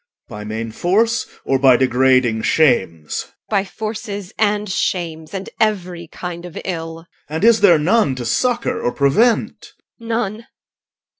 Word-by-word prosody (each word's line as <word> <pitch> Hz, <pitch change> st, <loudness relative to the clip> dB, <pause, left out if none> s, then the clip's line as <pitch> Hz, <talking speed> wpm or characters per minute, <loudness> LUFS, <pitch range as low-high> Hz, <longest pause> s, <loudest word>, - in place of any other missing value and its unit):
by 105 Hz, -3 st, -8 dB
main 110 Hz, +1 st, -5 dB
force, 220 Hz, -, +1 dB, 0.2 s
or 135 Hz, -1 st, +1 dB
by 130 Hz, -2 st, +6 dB
degrading 130 Hz, -2 st, +3 dB
shames? 95 Hz, -, +1 dB
EL. -, -, -30 dB, 0.2 s
By 200 Hz, -2 st, +1 dB
force 215 Hz, +3 st, -6 dB, 0.3 s
and 210 Hz, -1 st, +1 dB
shames, 165 Hz, -4 st, -2 dB
and 195 Hz, -1 st, -5 dB
every 180 Hz, -5 st, -1 dB
kind 175 Hz, +1 st, -7 dB
of 175 Hz, -2 st, -9 dB
evil. 165 Hz, -2 st, -5 dB
OR. 165 Hz, -, -23 dB, 0.2 s
And 160 Hz, +4 st, -3 dB
is 225 Hz, -2 st, +5 dB
there 180 Hz, -5 st, +6 dB
none 160 Hz, -, +2 dB
to 125 Hz, -1 st, -5 dB
succour 240 Hz, -, 0 dB
or 120 Hz, -, -1 dB
prevent? 210 Hz, -, +1 dB, 0.3 s
EL. 230 Hz, -, -10 dB
None. 225 Hz, -1 st, -2 dB
170 Hz, 150 wpm, -19 LUFS, 130-210 Hz, 0.3 s, by